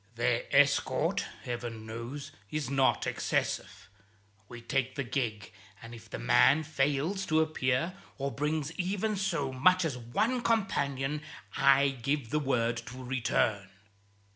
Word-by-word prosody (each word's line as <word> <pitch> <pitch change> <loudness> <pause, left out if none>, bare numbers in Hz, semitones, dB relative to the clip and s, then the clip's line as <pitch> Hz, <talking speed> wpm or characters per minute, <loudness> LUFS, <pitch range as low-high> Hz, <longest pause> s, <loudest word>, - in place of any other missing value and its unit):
Their 120 0 +1
escort, 145 +1 +3 0.2
Heaven 120 -2 -5
knows, 115 +6 -6 0.2
is 150 -4 -3
not 135 -1 +2
excessive. - - -2 0.6
We 120 - -8
take 130 +2 -1
the 140 - -1
gig, 120 -5 -3 0.3
and 115 +1 -10
if 115 - -12
the - - -5
man 135 - +4
fails 150 +5 0
to 155 0 +3
appear, 155 0 0 0.2
or 140 0 -2
brings 150 +1 -1
even 200 +4 0
so 165 -9 -1
much 185 +7 +4
as 135 -6 -2
one 215 - 0
companion, 150 - 0 0.3
I 140 0 +5
give 135 0 -2
the 150 - +2
word 120 -5 0
to 130 +3 -8
return." 115 -5 0
135 Hz, 135 wpm, -30 LUFS, 120-155 Hz, 0.6 s, I